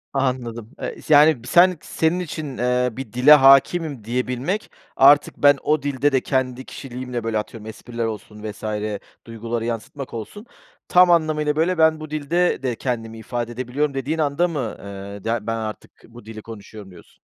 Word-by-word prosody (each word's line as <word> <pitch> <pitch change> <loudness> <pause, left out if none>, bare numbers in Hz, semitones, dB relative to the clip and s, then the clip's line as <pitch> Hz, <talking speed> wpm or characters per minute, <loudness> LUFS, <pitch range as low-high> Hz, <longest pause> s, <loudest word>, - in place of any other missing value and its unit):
Anladım, 120 -4 -2
eee, - - -4
yani, 150 -3 +6
sen 180 0 +5
senin 165 +3 0
için, 155 -6 -6
eee, 125 +1 +1
bir 115 -2 -8
dile 130 +5 +7
hâkimim 140 -1 +4
diyebilmek 125 - -3 0.2
artık 145 +2 +5
ben 145 -1 +5
o 155 0 +1
dilde 145 0 0
de 130 -1 +2
kendi 130 -1 -2
kişiliğimle, 125 -2 -6
böyle, 115 -1 -1
atıyorum, 110 0 -6
espriler 115 +1 -5
olsun 105 -1 -7
vs. 105 0 -7 0.6
duyguları 115 0 -4
yansıtmak 120 +4 -5
olsun. 115 - -8 0.4
Tam 180 0 +5
anlamıyla, 155 -3 +1
böyle, 170 +3 +1
ben 160 -1 +4
bu 155 -1 -8
dilde 155 +2 0
de 125 -2 -1
kendimi 115 -2 -4
ifade 120 +1 -4
edebiliyorum 130 +4 -2
dediğin 135 +4 -2
anda 155 +3 +1
mı, 140 -10 -4
eee, 100 0 -9
ya, 115 -1 -2
ben 115 - 0
artık 110 -1 -6 0.2
bu 120 -1 -15
dili 110 0 -9
konuşuyorum 105 -2 -11
diyorsun? 90 - -18
130 Hz, 165 wpm, -22 LUFS, 115-150 Hz, 0.6 s, dile